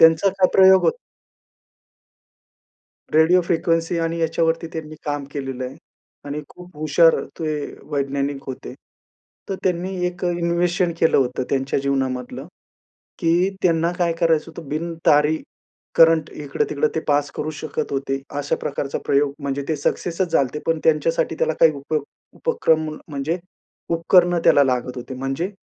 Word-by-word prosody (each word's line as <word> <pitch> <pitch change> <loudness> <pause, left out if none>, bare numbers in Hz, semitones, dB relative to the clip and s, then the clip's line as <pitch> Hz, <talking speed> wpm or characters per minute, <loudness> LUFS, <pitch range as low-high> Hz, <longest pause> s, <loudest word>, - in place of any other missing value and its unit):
त्यांचा 165 +4 +6
काय 185 -1 +5
प्रयोग 190 0 +7
होता? 475 - +2 2.2
रेडिओ 160 +4 +5
फ्रिक्वेन्सी 165 0 0
आणि 165 0 -1
याच्यावरती 165 0 0
त्यांनी 155 -1 -6
काम 145 -1 -2
केलेलं 135 -2 -4
आहे. 130 +2 -7 0.5
आणि 145 +1 -4
खूप 180 -2 -14
हुशार 155 +2 +4 0.2
ते 160 -2 -2 0.4
वैज्ञानिक 140 0 -2
होते. 130 - -7 0.7
तर 195 - -2
त्यांनी 185 +1 -1
एक 180 0 -4
अ, - - +2
इन्व्हेशन 175 +1 +1
केलं 165 - +4
होतं 130 -1 +1
त्यांच्या 135 0 0
जीवनामधलं. 130 0 -2 0.7
की 175 +2 +2
त्यांना 170 -1 +2
काय 170 -2 +2
करायचं 165 -1 +2
होतं? 160 -3 -10
बिनतारी 155 -1 +2 0.6
करंट 165 -1 +5
इकडं-तिकडं 145 +1 -1
ते 160 - 0
पास 145 0 +2
करू 155 - -3
शकत 155 -2 -4
होते. 135 0 -2 0.2
अशा 145 0 -1
प्रकारचा 140 -1 -3
प्रयोग 140 0 +2
म्हणजे 140 0 -2
ते 155 - 0
सक्सेसच 170 +4 -1
झाले 140 - +4
होते, 150 - -6
पण 165 -1 +1
त्यांच्यासाठी 160 +1 +2
त्याला 160 - +1
काही 160 - +7
उप 140 +2 -6 0.4
उपक्रम 160 - +1 0.2
म्हणजे 150 +4 -2 0.5
उपकरणं 175 +1 +3
त्याला 140 - +6
लागत 125 -1 -1
होते. 125 +2 -7
म्हणजे 135 +8 -3
160 Hz, 140 wpm, -22 LUFS, 140-170 Hz, 2.2 s, प्रयोग